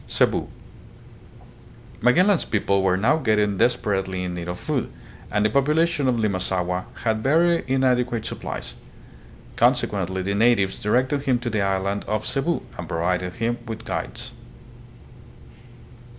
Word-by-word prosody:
Cebu. - - +1 1.5
Magellan's 180 - +4
people 100 -2 +1
were 95 -1 +2
now 125 +11 +3
getting 105 -8 +1
desper 105 -5 +2
ately 95 -1 -4
in 90 - -4
need 85 -1 -5
of 90 0 -4
food, - - -2 0.4
and 105 0 +1
the - - +4
population 150 +2 +2
on 120 -2 +1
Limasaua 90 -3 -1 0.2
had 110 -1 0
very 165 +6 +3
inadequate 125 -3 +1
supplies; - - -6 0.8
consequently 95 -2 +1
the 100 +2 -1
natives 105 -2 +2
directed 130 +6 +1
him 130 -2 +3
to 120 -1 -4
the 105 -1 0
island 100 +1 -1
of 105 0 -1
Cebu, 145 +5 -1 0.2
and 85 -2 -6
provided 90 +1 -1
him 115 +3 -2
with 110 0 -6
guides. 80 - -5
110 Hz, 135 wpm, -23 LUFS, 95-125 Hz, 1.5 s, Magellan's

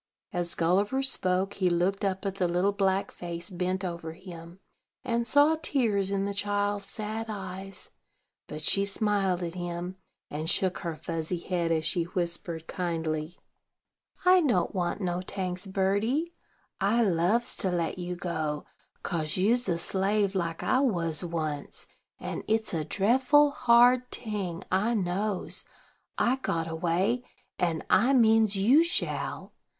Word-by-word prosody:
As 175 -1 -2
Gulliver 200 +10 +1
spoke, 190 -6 0
he 185 -3 +1
looked 180 +4 +1
up 190 -1 -1
at 195 - -1
the 180 - +2
little 180 +3 +2
black 195 -1 0
face 170 +1 -6
bent 185 +1 -2
over 170 -2 -5
him, 170 0 -11 0.4
and 235 0 -1
saw 290 +4 +5
tears 215 -11 +1
in 195 0 0
the 200 - -2
child's 205 0 -1
sad 215 +2 -4
eyes; 195 -1 -7 0.6
but 155 0 -6
she 195 +5 +3
smiled 200 -3 +1
at 170 -1 -4
him, 175 +1 -5 0.3
and 155 +2 -3
shook 185 +1 +1
her 165 -2 -4
fuzzy 165 +2 -3
head, 170 -1 -1
as 160 -1 +1
she 170 0 +1
whispered 170 -2 -3
kindly: 165 -2 -3 0.9
"I 365 0 +7
don't 235 - +1
want 180 +1 -1
no 180 -1 -1
tanks, 185 0 -4
birdie: 205 - 0 0.5
I 215 +5 +3
loves 195 +5 +2
to 190 - 0
let 175 0 -1
you 180 0 -3
go, 160 -4 -3 0.4
kase 155 -2 -2
you's 225 +4 +2
a 170 - +1
slave, 195 +3 0
like 170 -4 -2
I 255 - +3
was 175 - +1
once; 155 -4 -4 0.3
and - - -5
it's 220 -1 0
a 160 -2 0
dreffle 260 - +4
hard 245 +1 +5
ting, 195 -6 -4
I 210 +6 +2
knows. 195 +1 -2 0.5
I 255 +2 +2
got 165 -10 -2
away, 175 +9 0 0.4
and 165 -3 0
I 260 +3 +4
means 225 -4 +4
you 245 +12 +5
shall. 340 - -2
190 Hz, 145 wpm, -28 LUFS, 170-210 Hz, 0.9 s, I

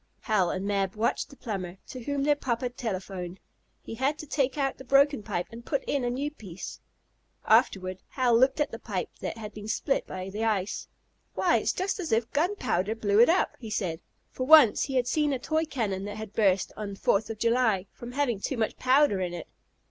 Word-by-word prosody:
Hal 200 -6 +2
and 185 +2 -3
Mab 195 -1 0
watched 220 +2 0
the 280 - -13
plumber, 190 -6 -5
to 255 - -7
whom 285 +2 -1
their 295 +1 +4
papa 250 -3 -2
telephoned. 190 -6 -5 0.4
He - - -7
had 265 +6 0
to 310 - -7
take 275 -1 0
out 275 -2 -1
the - - -8
broken 275 0 +4
pipe, 175 -3 -3
and 230 +1 -9
put 275 +1 -1
in 280 -3 -1
a 245 - 0
new 275 +4 -2
piece. 195 - -9 0.7
Afterward 185 -1 +3
Hal 250 -3 +2
looked 260 +4 +4
at 295 - +1
the 230 - -7
pipe 195 -6 -4
that - - -4
had 210 -2 -7
been 210 0 -8
split 270 +5 0
by 185 +1 -6
the 215 +3 -3
ice. 210 -3 -1 0.5
"Why - - +3
it's - - +1
just 385 +2 -2
as 345 - -4
if 225 +1 +1
gun 340 +8 +1
powder 200 - -1
blew 210 -2 +2
it 240 - +7
up," 350 - +2
he 225 - -8
said, 180 -6 -2 0.3
for 255 - -4
once 300 -8 +7
he 270 - -4
had 250 -1 +3
seen 295 +2 +1
a - - 0
toy 315 +5 0
cannon 210 -10 -2
that 205 +1 -6
had 215 -1 -7
burst 195 -3 +2
on 205 -2 -5
Fourth 200 +2 +1
of 225 - -5
July, 230 -4 +2
from 240 +1 -9
having 255 -6 0
too 260 +5 -3
much 220 -1 -1
powder 255 -6 +3
in 175 -1 -2
it. 175 - -7
230 Hz, 215 wpm, -28 LUFS, 200-275 Hz, 0.7 s, it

